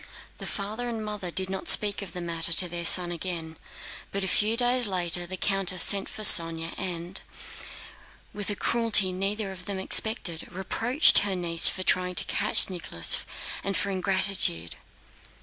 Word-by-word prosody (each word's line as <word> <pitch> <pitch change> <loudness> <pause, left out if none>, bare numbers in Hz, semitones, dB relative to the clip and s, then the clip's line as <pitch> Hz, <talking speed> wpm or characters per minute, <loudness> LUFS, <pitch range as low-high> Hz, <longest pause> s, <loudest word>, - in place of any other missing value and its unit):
The - - -7
father 215 +4 -5
and 225 -2 -6
mother 210 -4 -6
did 190 +2 -3
not 190 0 -5
speak 205 -1 +2
of 200 - -9
the 180 - -7
matter 170 -1 -1
to 180 +2 +2
their 170 -1 -5
son 175 -1 +4
again, 170 -2 -6 0.6
but 200 0 -5
a - - -3
few 215 +4 -1
days 245 -1 +1
later 175 -2 -2
the 185 +1 -7
countess 195 -3 +3
sent 200 -1 +5
for 215 - -7
Sónya 165 -3 +6
and, 175 0 -4 1.1
with 205 -1 -6
a 205 - -3
cruelty 220 -4 0
neither 195 +2 -4
of 185 -1 -12
them 200 -1 -5
expected, 190 -3 0
reproached 225 - +3
her 200 -1 -2
niece 170 -2 +2
for 185 - -5
trying 180 0 -1
to - - 0
catch - - -1
Nicholas 165 - 0 0.4
and 195 0 -3
for 200 - -2
ingratitude. 185 - +1
190 Hz, 165 wpm, -24 LUFS, 175-205 Hz, 1.1 s, Sónya